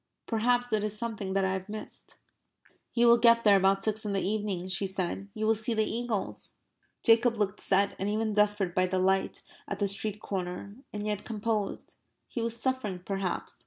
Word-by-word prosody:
Perhaps 245 +1 +1
it 210 -1 +2
is 215 0 -1
something 210 -4 -3
that 195 -1 +2
I 190 - 0
have 190 +1 -5
missed...." 215 0 -8 0.8
"You 240 0 +4
will 235 0 +7
get 230 0 +5
there 205 -2 +6
about 195 +1 +3
six 215 0 0
in 205 -2 -2
the 195 -1 0
evening," 205 -4 -2
she 195 +1 -1
said. 190 +1 -3
"You 215 0 -2
will 220 - +4
see 225 +1 -2
the 220 0 +2
eagles." 230 -3 -3 0.5
Jacob 230 0 +4
looked 205 -1 -1
set 200 +1 +2
and 195 - -1
even 215 +1 0
desperate 205 -3 +2
by 185 0 +2
the 185 +1 -1
light 190 +1 +1 0.2
at 200 - -3
the 200 0 +1
street 210 +1 0
corner 190 0 -5 0.2
and 210 0 -4
yet 210 -1 -2
composed. 215 -2 -3 0.3
He 235 - -4
was 230 0 -2
suffering, 255 -9 -2
perhaps. 195 -3 -3
210 Hz, 195 wpm, -29 LUFS, 195-225 Hz, 0.8 s, will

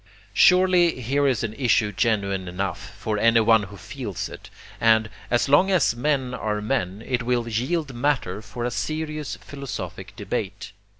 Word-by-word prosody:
Surely 180 -4 +5
here 140 +4 +1
is 125 -6 +1
an 110 -1 -3
issue 115 -4 +2
genuine 100 -3 0
enough, 90 0 -4
for 105 -1 -2
anyone 115 0 +5
who 100 0 -9
feels 110 -4 -5
it; - - -11 0.3
and, 110 -1 +3 0.2
as 120 +2 +2
long 145 +8 +5
as 175 -10 +3
men 130 -1 0
are 105 -3 -2
men, 105 -3 -2
it 125 -1 -1
will 120 0 0
yield 135 +6 -1
matter 120 -7 -1
for 115 +3 -6
a 125 - -1
serious 155 +2 -3
philosophic 100 - -7
debate. 105 0 -4
115 Hz, 155 wpm, -24 LUFS, 105-140 Hz, 0.3 s, Surely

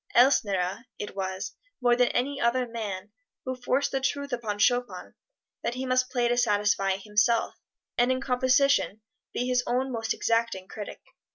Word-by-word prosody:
Elsner, 205 -5 +3
it 205 - -6
was, 190 -1 -3 0.3
more 245 -2 +4
than 250 0 +4
any 275 +4 -1
other 245 +1 +2
man, 210 -4 -5 0.3
who 260 0 -2
forced 255 +2 0
the 270 - 0
truth 280 0 -2
upon 220 -4 -2
Chopin 245 +4 +1 0.5
that 235 +1 -2
he 260 +1 -3
must 255 0 +2
play 245 -2 +1
to 240 0 +1
satisfy 205 -4 +2
himself, 215 +3 +1 0.5
and 245 +1 +4
in 260 - +1
composition 260 -3 +2 0.3
be 245 - -2
his 250 0 +2
own 260 +2 0
most 225 -2 -2
exacting 230 -5 0
critic. 210 -2 -8
240 Hz, 160 wpm, -27 LUFS, 210-255 Hz, 0.5 s, more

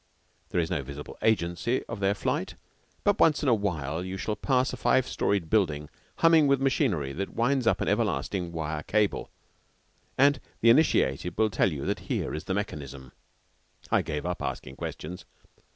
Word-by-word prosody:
There - - 0
is 80 - -1
no 75 - 0
visible 70 +2 -8
agency 95 +3 +1
of 115 - -6
their 100 +1 +2
flight, - - -2 0.5
but 205 0 +2
once 155 -2 +4
in 140 - +3
awhile 85 - 0
you 95 +1 -5
shall 105 +2 -2
pass 130 0 +1
a - - -4
five 130 +1 +2
storied 100 -5 0
building 75 -8 +1 0.3
humming 165 -3 +5
with 140 -1 +3
machinery 120 - +1
that 100 +6 -5
winds 125 +1 +1
up - - +2
an - - -1
everlasting 90 -4 0
wire 80 -2 -3
cable, 105 +4 0 0.9
and 140 +1 +5 0.2
the 115 - +6
initiated 90 - +2
will 110 0 +2
tell 95 - +2
you 70 -3 -4
that - - -1
here - - -1
is 80 - -5
the 95 - -1
mechanism. 70 -10 -5 0.8
I - - +4
gave 75 0 -4
up 90 0 -3
asking 65 0 -5
questions. 90 +4 -6
95 Hz, 170 wpm, -28 LUFS, 75-120 Hz, 0.9 s, the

